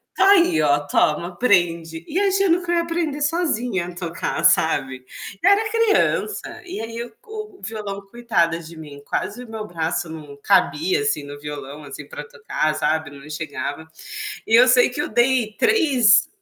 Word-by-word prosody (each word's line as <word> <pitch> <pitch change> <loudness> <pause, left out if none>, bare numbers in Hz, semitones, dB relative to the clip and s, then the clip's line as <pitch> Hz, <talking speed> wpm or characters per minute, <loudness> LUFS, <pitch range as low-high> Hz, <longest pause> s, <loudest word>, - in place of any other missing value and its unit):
"Tá 390 +1 +5
aí, 345 - +4
ó, 145 -1 +3
toma, 155 +4 +1
aprende". 170 -5 +1
E 350 - -1
achando 390 -3 +2
que 345 - -3
eu - - +2
ia 340 - +3
aprender 330 -3 -2
sozinha 250 - 0
a 175 - -9
tocar, 170 -2 -4
sabe. 130 -1 +2 0.4
Eu - - +6
era 435 +2 +3
criança. 425 -5 0
E 365 - -6
aí 230 +1 -5 0.2
o 430 -2 -9
violão 205 -1 -5
coitada 195 -9 0
de 165 0 -11
mim, 145 -2 -10
quase 235 +10 -3
o 230 - -14
meu 220 -1 -6
braço 165 0 -2
não 150 -3 -9
cabia, 155 +8 +2
assim, 185 -9 0
no 145 0 -9
violão, 145 0 -8
assim, 145 +1 -9
para - - -8
tocar, 445 - -2
sabe, 155 0 0
não 140 +1 -12
chegava. 160 +1 -5 0.6
E 225 - +1
eu 250 +2 +8
sei 250 0 +6
que 270 - -4
eu - - -3
dei 240 -2 +2
3, 280 - +4
210 Hz, 170 wpm, -21 LUFS, -, 0.6 s, eu